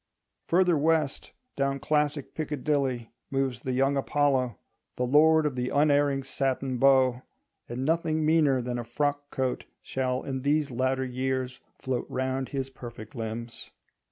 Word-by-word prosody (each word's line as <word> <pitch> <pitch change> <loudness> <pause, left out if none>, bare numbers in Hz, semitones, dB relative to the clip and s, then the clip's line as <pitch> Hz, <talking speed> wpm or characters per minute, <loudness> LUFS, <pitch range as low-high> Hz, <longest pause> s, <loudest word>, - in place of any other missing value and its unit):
Further 180 0 +4
west, 155 -2 +1 0.2
down 140 0 0
classic 150 0 0
Piccadilly, 140 -5 -1 0.2
moves 135 -3 -1
the 130 - -3
young 135 +2 +2
Apollo, 135 -4 +1 0.4
the 125 - 0
lord 155 +4 +5
of 145 -3 -1
the 125 0 -1
unerring 145 -1 +3
(satin) 135 -1 -2
bow; 130 -2 +4 0.5
and 125 +3 -3
nothing 160 0 +1
meaner 150 -5 +3
than 120 0 -3
a - - -3
frock 145 +4 -2
coat 130 -2 -2 0.2
shall 130 -1 -1
in 130 -1 -3
these 145 +1 +1
latter 130 +2 0
years 130 0 -2 0.2
float 130 -2 -3
round 130 0 -2
his 135 -2 -3
perfect 120 -1 -10
limbs. 115 -1 -6
135 Hz, 140 wpm, -28 LUFS, 125-145 Hz, 0.5 s, lord